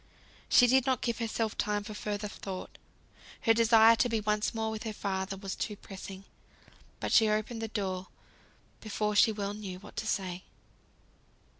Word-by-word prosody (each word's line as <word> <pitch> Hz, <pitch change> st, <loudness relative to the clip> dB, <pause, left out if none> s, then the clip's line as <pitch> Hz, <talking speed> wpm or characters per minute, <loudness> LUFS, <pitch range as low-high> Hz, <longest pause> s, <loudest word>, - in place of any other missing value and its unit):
She 245 Hz, -, +7 dB
did 260 Hz, +1 st, +4 dB
not 260 Hz, -3 st, +1 dB
give 235 Hz, -1 st, -1 dB
herself 225 Hz, -1 st, -1 dB
time 210 Hz, -1 st, -1 dB
for 215 Hz, -, -7 dB
further 210 Hz, 0 st, -3 dB
thought, 195 Hz, -2 st, -7 dB, 0.6 s
her 225 Hz, -, +5 dB
desire 225 Hz, 0 st, +6 dB
to 245 Hz, -, +2 dB
be 225 Hz, -1 st, +1 dB
once 210 Hz, 0 st, 0 dB
more 220 Hz, -1 st, -2 dB
with 220 Hz, -1 st, -5 dB
her 220 Hz, -2 st, -4 dB
father 195 Hz, -1 st, -3 dB
was 195 Hz, 0 st, -5 dB
too 210 Hz, -, -3 dB
pressing; 195 Hz, -1 st, -9 dB, 0.8 s
but -, -, -3 dB
she 220 Hz, -2 st, +6 dB
opened 215 Hz, +2 st, -1 dB
the 225 Hz, -, -2 dB
door, 190 Hz, -4 st, -3 dB, 0.7 s
before 210 Hz, -1 st, -2 dB
she 220 Hz, -, +6 dB
well 205 Hz, -1 st, -3 dB
knew 200 Hz, -3 st, -6 dB
what 190 Hz, -, -13 dB
to 220 Hz, -, -2 dB
say. 185 Hz, -3 st, -2 dB
210 Hz, 170 wpm, -30 LUFS, 200-225 Hz, 0.8 s, She